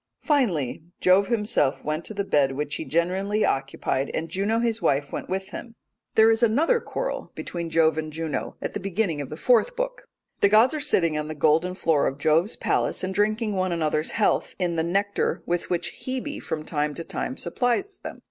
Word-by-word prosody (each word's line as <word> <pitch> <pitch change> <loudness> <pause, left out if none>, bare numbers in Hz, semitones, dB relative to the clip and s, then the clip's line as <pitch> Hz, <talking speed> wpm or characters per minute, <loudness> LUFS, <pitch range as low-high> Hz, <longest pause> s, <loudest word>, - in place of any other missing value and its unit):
Finally 195 - +1 0.2
Jove 190 +2 +4
himself 210 - +1
went 155 +2 -2
to 215 - -7
the 200 - -1
bed 140 -7 +2
which 145 +1 -3
he - - -3
generally 190 +6 +1
occupied; 135 0 -1
and 165 +1 -3
Jove 205 +6 0
his 230 -1 0
wife 140 0 +1
went - - -5
with 190 +1 -3
him. 230 +2 -8 0.4
There 220 +1 +7
is 225 +1 +1
another 290 - +3
quarrel - - -4
between 170 -1 -5
Jove 160 -1 +3
and 155 0 -4
Juno 160 -1 -3
at - - -3
the - - -3
beginning 185 -5 -1
of 140 - -6
the 155 - -7
fourth 250 - +3
book. - - -4 0.3
The 200 - +5
gods 220 +6 +5
are 305 - -2
sitting 170 - +1
on 150 - -4
the 155 - -5
golden 160 +5 +2
floor 160 -5 +2
of 135 - -3
Jove's 160 +7 +2
palace - - 0
and 185 +1 -2
drinking 215 +2 +1
one 185 -1 0
another's 155 -2 0
health 215 - +1
in 175 -2 -1
the 160 - +1
nectar 200 +5 0
with 175 0 -2
which 175 -1 -1
Hebe 260 +3 -4
from 155 -1 -4
time 150 -2 -1
to 165 - -5
time 260 - -4
supplies 380 - -1
them. - - -8
185 Hz, 200 wpm, -25 LUFS, 155-225 Hz, 0.4 s, There